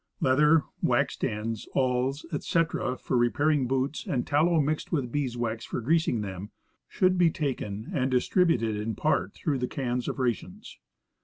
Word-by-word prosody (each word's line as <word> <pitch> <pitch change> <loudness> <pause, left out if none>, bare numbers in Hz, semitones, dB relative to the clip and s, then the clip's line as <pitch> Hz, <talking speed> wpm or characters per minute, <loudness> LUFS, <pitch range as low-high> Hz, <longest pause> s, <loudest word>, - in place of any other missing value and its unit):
Leather, 150 +4 +4 0.2
waxed - - +1
ends, 110 +1 -3
awls, 130 +2 0
etc., 155 -4 0
for - - -3
repairing 135 +3 +2
boots, 135 +3 -1
and 125 -3 -1
tallow 160 +3 +3
mixed 150 +1 -1
with 135 -8 -1
bees 130 -4 -2
wax 115 -1 -2
for - - -4
greasing 140 -2 +1
them, 95 0 -6 0.4
should 185 -1 +2
be 175 -2 +6
taken 125 - -4
and 130 -4 +1
distributed 125 - +2
in 105 +1 -3
part - - 0
through 140 -4 -1
the 125 - -1
cans 125 -2 -2
of - - -3
rations. 125 -5 -3
130 Hz, 155 wpm, -27 LUFS, 120-150 Hz, 0.4 s, be